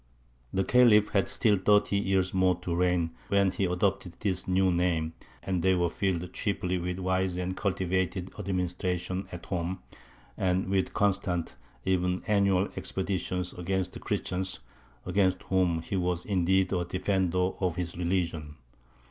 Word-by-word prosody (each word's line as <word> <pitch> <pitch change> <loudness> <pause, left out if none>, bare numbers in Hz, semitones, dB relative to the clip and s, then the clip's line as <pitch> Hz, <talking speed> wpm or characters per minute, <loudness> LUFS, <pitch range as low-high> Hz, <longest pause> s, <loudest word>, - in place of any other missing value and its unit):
" - - -36
The 95 - +2
Khalif 110 -3 +5
had 100 -4 +1
still 105 -4 +3
thirty 105 +1 +3
years 95 -2 +1
more 95 -1 +3
to 85 -2 -2
reign 90 -2 +1 0.2
when 100 -1 +3
he 95 - -1
adopted 90 0 0
this 95 -3 -1
new 95 0 +3
name; 85 -2 0 0.3
and 90 -2 -1
they 95 +1 +3
were 85 -2 +1
filled 90 -2 -2
chiefly 90 -3 -1
with 90 +1 -3
wise 95 -1 0
and 90 +1 -2
cultivated 95 -1 -1
administration 90 0 -2
at 90 - -8
home, 90 +1 -3 0.5
and 95 0 0
with 95 -1 0
constant, 90 -7 0 0.3
even 90 -1 +1
annual, 100 -2 +3
expeditions 90 -1 -2
against 95 +1 -2
the - - -7
Christians, 95 0 -3 0.4
against 95 0 +1
whom 90 -4 +1
he 100 - -4
was 90 -1 -1
indeed 95 -1 +2
a 90 -1 +1
"Defender" 90 0 0
of 90 -4 0
his 90 -2 -3
religion. 85 -4 -2
90 Hz, 150 wpm, -29 LUFS, 90-95 Hz, 0.5 s, Khalif